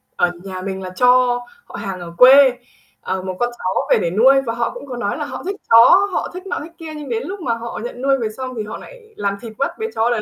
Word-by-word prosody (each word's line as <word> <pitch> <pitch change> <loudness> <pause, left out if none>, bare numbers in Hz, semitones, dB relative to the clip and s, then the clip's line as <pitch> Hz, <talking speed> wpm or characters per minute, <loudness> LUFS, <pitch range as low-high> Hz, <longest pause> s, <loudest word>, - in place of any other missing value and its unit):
ở 175 0 +2
nhà 190 -1 -6
mình 190 0 -5
là 185 - -6
cho 245 +4 +3 0.3
họ - - -12
hàng 195 -3 -5
ở 170 -1 -9
quê, 260 0 +8 0.5
ờ, 190 0 -3
một 185 -1 -5
con 240 0 +1
chó 185 +1 -2
về - - +6
để 170 - -1
nuôi, 260 +8 +5
và 230 -4 -3
họ 235 0 -1
cũng - - -9
có 255 -3 -7
nói 205 +1 -2
là 295 - -3
họ - - -7
thích 390 +2 -3
chó, 240 +13 +7
họ - - -2
thích 365 +2 -8
nọ - - -3
thích 330 - -11
kia. 320 -1 -8
Nhưng 295 -2 -8
đến 455 0 -2
lúc 390 +2 -6
mà 240 -7 0
họ 230 0 -6
nhận 245 +1 -7
nuôi 275 0 +2
về 225 -3 -2
xong 255 +3 -7
thì 215 - -2
họ 210 - -7
lại 455 -3 -15
làm 200 - -2
thịt 225 -2 -9
mất 340 +5 -2
bé 445 - -3
chó 225 +2 +2
đấy, 235 -3 0
245 Hz, 280 wpm, -19 LUFS, 205-280 Hz, 0.5 s, quê